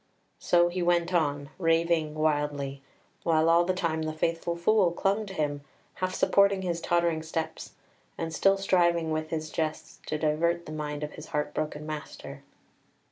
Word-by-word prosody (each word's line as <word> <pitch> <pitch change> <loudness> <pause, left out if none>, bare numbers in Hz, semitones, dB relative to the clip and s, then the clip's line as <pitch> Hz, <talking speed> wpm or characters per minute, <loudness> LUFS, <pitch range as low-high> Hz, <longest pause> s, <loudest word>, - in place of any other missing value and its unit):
So 175 0 +4
he 180 +1 -3
went 175 0 +2
on, 145 -3 0
raving 165 -2 +2
wildly, 145 -3 -1 0.4
while 160 -1 +2
all 170 +1 +5
the 185 +1 0
time 165 -3 -1
the 155 0 -2
faithful 165 +2 -1
Fool 180 +1 +3
clung 200 +4 0
to 195 - -7
him, 145 -2 -1 0.3
half 185 0 -3
supporting 200 -1 +3
his 170 -2 -2
tottering 170 -2 +1
steps, 160 0 -5 0.4
and 165 -1 -4
still 195 +3 +3
striving 170 -4 +2
with 155 0 -2
his 155 -1 -4
jests 155 -1 -3
to 155 - -1
divert 170 +3 0
the - - -8
mind 150 -1 -4
of 150 - -4
his 155 - -10
heart 150 0 -2
broken 150 0 -3
master. 155 -1 -7
165 Hz, 165 wpm, -28 LUFS, 155-175 Hz, 0.4 s, all